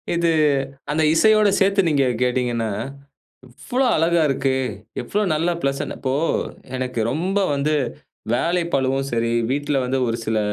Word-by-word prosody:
இது 170 0 +2 0.6
அந்த 160 +1 +1
இசையோடு 215 +4 +5
சேர்த்து 195 -1 +3
நீங்க 140 -3 +2 0.2
கேட்டீங்கனா, 120 -3 0 0.8
எவ்வளவு 250 - -1
அழகா 170 +1 +2
இருக்கு! 135 0 0 0.5
எவ்வளவு 200 +7 -1
நல்ல 160 +3 0
பிளசன்ட் 140 0 -2
இப்போ 130 -1 -1 0.6
எனக்கு 125 -2 -3
ரொம்ப 180 +8 -1 0.2
வந்து 145 +2 0 0.6
வேலை 170 +8 +1
பழுவும் 135 0 0
சரி, 115 0 0 0.2
வீட்டில 145 +1 0
வந்து 130 +1 0
ஒரு 115 - -2
சில 110 0 +1
140 Hz, 130 wpm, -21 LUFS, 130-170 Hz, 0.8 s, இசையோடு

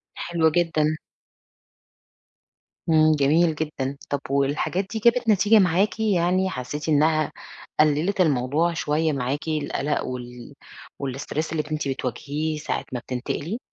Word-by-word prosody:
حلو 165 -2 +1
جدًا. 155 -2 +1 1.9
إمم، 155 -1 +5
جميل 155 +3 +3
جدًا. 140 -3 -3
طَب 145 - -1
والحاجات 145 +7 0
دي 220 - -2
جابت 235 +1 +3
نتيجة 210 +2 +5
معاكِ 190 +4 +2
يعني؟ 185 -2 +2
حسّيتِ 150 +3 -5
إنها 155 0 +3 0.5
قلّلت 155 +6 +3
الموضوع 150 +2 +2
شوية 155 0 0
معاكِ، 140 +4 -2
القلق 150 -2 -1
وال 125 0 -7 0.5
والstress 140 +4 -3
اللي 155 -1 -1
أنتِ 155 -2 -2
بتواجهيه 145 +4 -3
ساعة 150 - -3
ما 125 - -2
بتنتقلي؟ 140 - -4
155 Hz, 120 wpm, -24 LUFS, 140-175 Hz, 1.9 s, إمم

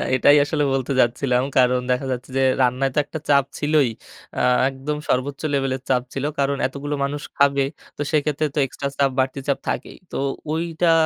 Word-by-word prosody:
এটাই 145 +3 +6
আসলে 150 0 0
বলতে 135 0 -1
যাচ্ছিলাম। 125 +1 +1
কারণ 125 0 +4
দেখা 125 +2 0
যাচ্ছে 125 +1 -4
যে 135 - +3 0.2
রান্নায় 130 +1 +2
তো - - +4
একটা 160 - -6
চাপ 140 -2 +5
ছিলই। 150 -3 +3 0.5
আ - - 0 0.3
একদম 140 +3 -4
সর্বোচ্চ 135 +2 0
লেভেলের 135 -1 0
চাপ 125 -2 +3
ছিল। 135 - -3 0.2
কারণ 140 0 +1
এতগুলো 145 +2 -4
মানুষ 145 +1 -2 0.2
খাবে 140 -1 +3 0.3
তো - - -4
সেক্ষেত্রে 150 0 +1
তো - - +1
এক্সট্রা 140 +2 -4
চাপ 140 -1 +3
বাড়তি 130 +1 0
চাপ 140 - +1
থাকেই। - - -4
তো - - -4 0.3
ঐটা 165 +1 +1
140 Hz, 180 wpm, -22 LUFS, 130-145 Hz, 0.5 s, এটাই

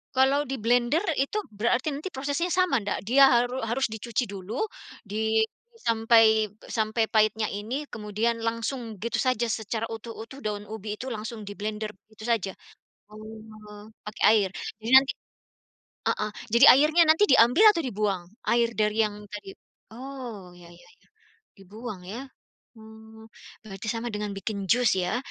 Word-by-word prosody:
Kalau 270 +3 +3
diblender 245 - +1 0.2
itu 275 +10 0
berarti 235 +6 0
nanti 290 +7 -5
prosesnya 285 +5 -2
sama 365 -8 +2
ndak? 200 - -3
Dia 270 +6 +6
haru 245 +1 +2
harus 235 +4 0
dicuci 225 +3 -2
dulu 200 +4 -6 0.4
di 220 +1 +1 0.3
sampai 225 - +4 0.2
sampai 220 0 0
pahitnya 215 0 +2
ini, 230 +9 -4
kemudian 220 +2 -2
langsung 230 0 -3
gitu 235 +4 -3
saja 255 -3 +1
secara 220 0 -3
utuh-utuh 225 +3 -9
daun 210 -2 -4
ubi 215 0 -6
itu 255 - -7
langsung 220 0 -6
diblender, 210 +1 -5 0.2
begitu 215 0 -14
saja. 225 -5 0 0.6
Oh, 215 -1 -12 0.2
pakai 210 - -7
air, 205 -3 +3 0.3
jadi 225 +2 -5
nanti 270 +1 +6 1.0
heeh, 210 0 -1 0.2
jadi 235 +4 +5
airnya 305 +6 +5
nanti 320 +5 +5
diambil 245 - +6
atau 360 -6 +3
dibuang, 205 -6 -1 0.3
air 235 0 +2
dari 215 -1 0
yang 210 -1 -3
tadi? 200 -1 -8 0.4
Oh, 235 -8 -9
iya, 175 -1 -15
iya, 175 0 -18
iya, - - -32 0.5
dibuang 205 +2 -9
ya. 235 +9 -7 0.5
Mmm, 220 0 -14 0.4
berarti 195 -1 -9
sama 235 0 -2
dengan 210 0 -3
bikin 195 0 -4
jus 245 -2 +4
ya, 180 +6 -1
220 Hz, 140 wpm, -26 LUFS, 210-245 Hz, 1.0 s, Dia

